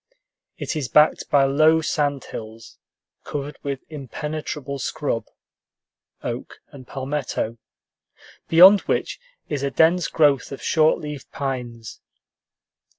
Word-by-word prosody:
It - - -4
is 145 -5 -2
backed 150 +4 +3
by 140 -1 +4
low 155 +4 +4
sand 145 -3 -1
hills 110 0 -10 0.4
covered 145 0 -6
with 140 -2 -4
impenetrable 150 -1 -5
scrub, 120 -4 -2 1.0
oak - - -6
and 130 -3 -13
palmetto, 135 -4 -3 0.9
beyond 185 +5 +8
which - - -1 0.3
is 145 -3 -3
a 140 - 0
dense 165 +5 +3
growth 145 -4 +2
of 135 - -6
short 155 -1 +3
leaved 150 -3 -8
pines. 120 -5 -5
140 Hz, 110 wpm, -23 LUFS, 130-155 Hz, 1.0 s, beyond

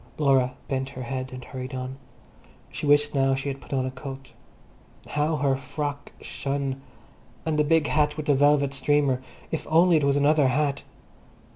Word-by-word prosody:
Laura 135 -4 +3
bent 135 -1 -2
her 130 -2 -7
head 130 +1 -4
and 125 -1 -8
hurried 130 0 -6
on. 130 +1 -5 0.7
She - - -4
wished 145 0 +4
now 135 -1 +3
she 135 +1 -3
had 135 0 -6
put - - -15
on 130 -2 0
a 130 - -3
coat. 135 +1 -9 0.8
How 150 +2 0
her 140 -2 +1
frock 145 +2 -5
shone! 135 -1 -3 0.6
And 155 -2 0
the - - +5
big 160 0 +3
hat 150 0 +1
with 155 - -4
the 145 - +4
velvet 140 0 +3
streamer—if 140 +1 -1
only 165 +1 +5
it 150 - 0
was 140 0 +3
another 145 0 +4
hat! 140 +2 0
140 Hz, 170 wpm, -25 LUFS, 130-150 Hz, 0.8 s, the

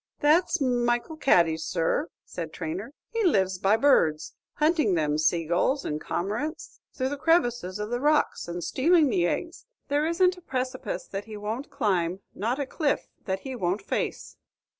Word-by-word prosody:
"That's 330 +4 +3
Michel 245 +2 0
Cady's, 165 - +3
sir," 170 - 0 0.2
said - - -6
Traynor; 315 -3 -5 0.2
"he 460 -1 0
lives 190 - +2
by 200 +4 +3
birds, 160 - +3 0.2
hunting 305 - +2
them 150 -2 +1
saygulls 170 - +1
and 150 +1 -3
cormorants 215 - -4
through 260 0 -2
the 285 - -4
crevices 240 - +1
of 210 +2 -4
the 245 - 0
rocks, 300 - +2
and 175 0 -4
stealing 310 0 +3
the 175 -4 +2
eggs. 340 - -4 0.2
There 290 +2 +2
isn't 360 +2 +2
a - - -20
precipice 255 -4 -3
that 195 +1 -6
he 215 -1 -8
won't 220 +6 -4
climb, 180 -2 0
not 230 +6 -1
a 285 - -1
cliff 285 +2 -1 0.2
that 190 0 -2
he 265 -1 -6
won't 195 -2 -1
face." - - -3
240 Hz, 160 wpm, -27 LUFS, 185-300 Hz, 0.2 s, That's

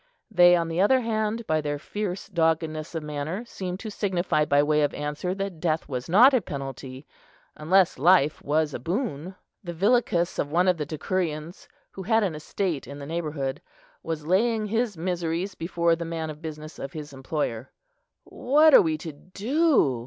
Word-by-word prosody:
They, 175 -3 +7
on 170 -1 0
the 165 +2 -1
other 255 +6 +4
hand, 220 0 -2
by 155 -3 +1
their 145 -1 -2
fierce 195 +4 -5
doggedness 160 -3 -1
of 160 - -3
manner, 150 +8 -4
seemed 185 -5 -6
to 220 - -6
signify 180 -6 0
by 145 0 +3
way 150 0 +2
of 145 - 0
answer 150 +5 -3
that 195 -4 -4
death 160 -1 -1
was 125 -1 -5
not 240 +10 +7
a 255 - +3
penalty, 135 -2 -7 0.5
unless 175 0 +2
life 155 -1 +4
was 150 0 0
a - - -4
boon. 180 - -3 0.3
The 175 -2 -6
villicus 195 -3 +1
of 145 - -1
one 180 +3 +2
of 180 -2 +3
the 150 -2 -4
decurions, 160 0 -3 0.2
who 195 - -8
had 220 +3 +2
an 185 -5 -1
estate 155 +1 -3
in 140 - -8
the 140 - -8
neighbourhood, 150 -4 -3 0.4
was 160 -2 -5
laying 215 +5 +2
his 220 -2 -1
miseries 175 +2 -2
before 170 0 0
the 170 - -5
man 165 -1 -4
of 150 0 -12
business 155 -1 -8
of 135 - -6
his 150 -2 -8
employer. 135 -3 -3 0.5
"What 300 +4 +3
are - - +10
we 160 -2 0
to 160 +1 -7
do?" 200 - +1
165 Hz, 180 wpm, -25 LUFS, 150-195 Hz, 0.5 s, are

